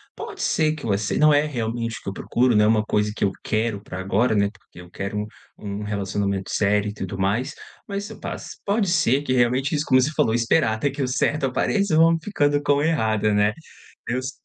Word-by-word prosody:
pode 430 -3 -7
ser 155 - +2
que 155 -6 -7
acei 100 +1 0
não 150 0 +6
é 145 +1 +4
realmente 115 -4 -3
o - - -22
que - - -5
eu - - -5
procuro, 120 +3 +1
né, 105 0 +5
uma 110 0 +3
coisa 105 0 0
que - - -3
eu 100 - +2
quero 110 -1 -1
pra 95 - -7
agora, 100 +6 +1
né, 100 -1 +2
porque 95 -3 -16
eu 90 - -14
quero 100 +3 -5
um 105 - -4 0.3
um 100 0 -5
relacionamento 100 -1 -2
sério 105 0 +1
e - - -6
tudo 95 -2 -6
mais, 110 +9 0 0.3
mas 200 0 -4
eu - - -9
o - - -19
pá, - - -4 0.3
pode 205 0 +1
ser 140 -6 +2
que 135 - -3
realmente 130 +3 +2
isso, 150 0 -1
como 130 - +5
você 140 +4 0
falou, 110 - +2
esperar 115 +1 +2
até 110 +6 0
que - - -5
o - - 0
certo 140 +3 0
apareça, 195 +7 0
vão 165 +1 +5
ficando 145 -7 +1
com 145 -1 +3
errada, 110 -9 +1
né? 105 +1 +3 0.5
Deus 130 +2 -2
115 Hz, 225 wpm, -23 LUFS, 105-145 Hz, 0.5 s, não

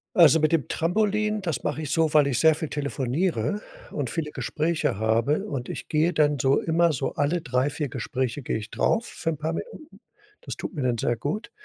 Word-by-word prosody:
Also 165 -3 +7
mit 155 +1 +2
dem 165 -4 +1
Trampolin, 210 +4 0
das 165 -9 -3
mache 150 +1 -2
ich 150 - -4
so, 160 -1 +2
weil 150 -2 +5
ich 125 -4 0
sehr 160 +1 +5
viel 160 -1 -4
telefoniere 150 - -1 0.3
und 140 -6 -3
viele 155 -3 -3
Gespräche 155 -9 -1
habe. 115 - +1
Und 135 -11 -4
ich - - -6
gehe 160 +3 +2
dann 145 -2 +2
so 135 +2 +3
immer 170 +1 +2
so 135 0 -2
alle 160 +4 +1
3, 130 -1 0
4 145 -1 -3
Gespräche 130 +2 -3
gehe 115 - -2
ich 110 0 -7
drauf 235 +1 +1
für 165 - -4
'n 155 - -2
paar 155 +2 -2
Minuten. 315 - -8 0.4
Das - - -6
tut - - -6
mir 150 - -4
dann 120 -2 +1
sehr 120 - 0
gut. 165 - -4
150 Hz, 210 wpm, -25 LUFS, 135-170 Hz, 0.4 s, Also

